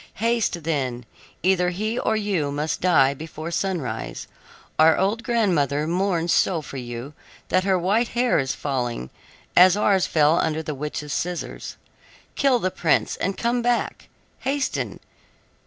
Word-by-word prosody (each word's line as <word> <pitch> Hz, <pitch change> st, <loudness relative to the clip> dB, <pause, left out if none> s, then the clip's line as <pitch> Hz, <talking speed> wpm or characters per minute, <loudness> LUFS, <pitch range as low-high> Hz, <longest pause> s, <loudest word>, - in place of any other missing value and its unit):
Haste, 225 Hz, -6 st, 0 dB
then; 130 Hz, -6 st, -2 dB, 0.4 s
either 180 Hz, -1 st, +3 dB
he 215 Hz, +6 st, -2 dB
or 220 Hz, -, +1 dB
you 195 Hz, -9 st, -1 dB
must 150 Hz, +2 st, -2 dB
die 155 Hz, -7 st, +4 dB
before 160 Hz, +3 st, -7 dB
sunrise. 170 Hz, -, -3 dB, 0.5 s
Our 160 Hz, 0 st, +6 dB
old 205 Hz, +4 st, +1 dB
grandmother 170 Hz, -, +1 dB
mourns 175 Hz, 0 st, 0 dB
so 165 Hz, -4 st, +2 dB
for 140 Hz, -, -8 dB
you 120 Hz, +3 st, -6 dB, 0.4 s
that 185 Hz, 0 st, +2 dB
her 190 Hz, -1 st, +3 dB
white 205 Hz, +7 st, +1 dB
hair 245 Hz, -1 st, +3 dB
is 135 Hz, -1 st, -1 dB
falling, 120 Hz, -, -3 dB, 0.4 s
as 185 Hz, +2 st, +7 dB
ours 195 Hz, -3 st, +3 dB
fell 155 Hz, +1 st, +3 dB
under 160 Hz, 0 st, 0 dB
the 155 Hz, -, -4 dB
witch's 150 Hz, +1 st, -5 dB
scissors. 175 Hz, 0 st, -4 dB, 0.6 s
Kill 275 Hz, -3 st, +3 dB
the 185 Hz, -5 st, -1 dB
prince, 165 Hz, -3 st, +1 dB
and 195 Hz, +1 st, -2 dB
come 240 Hz, +1 st, 0 dB
back. 240 Hz, 0 st, -1 dB, 0.3 s
Hasten! 275 Hz, +1 st, -2 dB
175 Hz, 140 wpm, -23 LUFS, 150-200 Hz, 0.6 s, as